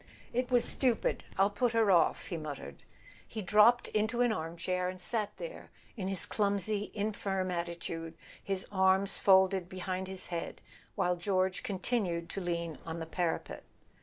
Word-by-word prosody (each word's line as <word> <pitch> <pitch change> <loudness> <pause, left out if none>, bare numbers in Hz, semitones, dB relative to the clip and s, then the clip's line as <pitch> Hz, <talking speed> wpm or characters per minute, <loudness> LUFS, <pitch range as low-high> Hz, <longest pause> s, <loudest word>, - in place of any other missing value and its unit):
"It 250 +1 0
was 245 -2 +3
stupid—I'll 220 -5 +1
put 235 +3 +1
her 225 -3 +4
off," 170 -3 +3
he 175 - -4
muttered. 145 - -7 0.5
He 220 -2 -5
dropped 215 +5 +5
into 220 +3 0
an 245 -1 +4
armchair, 180 0 -2
and 185 0 -7
sat 210 +3 -1
there, - - -8 0.3
in 195 -5 -3
his 195 -3 +1
clumsy 205 0 0
infirm 200 -3 -1
attitude, 170 -1 -4 0.3
his 195 -1 0
arms 190 0 +3
folded 190 -2 +4
behind 185 0 -3
his 190 -1 -3
head, 170 -1 -4 0.4
while 180 0 +1
George 185 0 0
continued 185 -4 -1
to 195 - -4
lean 170 -3 -3
on 165 0 -5
the 165 - -4
parapet. 170 +1 -2
190 Hz, 150 wpm, -32 LUFS, 175-210 Hz, 0.5 s, dropped